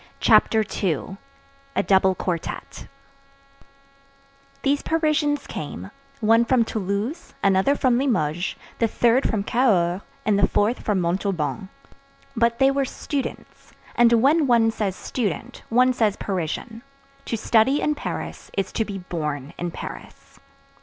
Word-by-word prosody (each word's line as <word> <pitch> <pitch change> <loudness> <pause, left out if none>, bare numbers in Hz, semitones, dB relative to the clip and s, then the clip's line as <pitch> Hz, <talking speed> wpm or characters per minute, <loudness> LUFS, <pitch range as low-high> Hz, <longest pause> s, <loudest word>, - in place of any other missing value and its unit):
CHAPTER 220 - +4 0.2
II—A 275 - -4
DOUBLE 190 -1 +3
QUARTETTE 175 -3 -5 1.8
These 285 +1 +2
Parisians 305 -3 0
came, - - -7 0.3
one 225 +2 +5
from 235 -1 +2
Toulouse, 210 - -3
another 195 +8 +3
from 250 -3 +2
Limoges, 175 - 0 0.2
the 230 - +3
third 240 +3 +2
from 215 -4 -1
Cahors, 195 -7 +2 0.2
and 205 -1 +2
the 195 - +4
fourth 220 +4 +1
from 205 -3 0
Montauban; 185 +1 -2 0.7
but 235 0 +2
they 270 0 +4
were 275 0 +1
students; 275 +1 -6 0.2
and 235 -1 +5
when 280 +6 +4
one 230 -2 +4
says 200 -4 -2
student, 230 - -4
one 255 +2 +4
says 220 -4 +1
Parisian: 195 +5 -4 0.4
to 230 - -2
study 235 +6 +3
in 300 - +1
Paris 295 - -6
is 195 -1 -1
to 225 - 0
be 200 -2 -6
born 150 -6 -4
in 175 - -2
Paris. - - -10
225 Hz, 125 wpm, -23 LUFS, 190-260 Hz, 1.8 s, one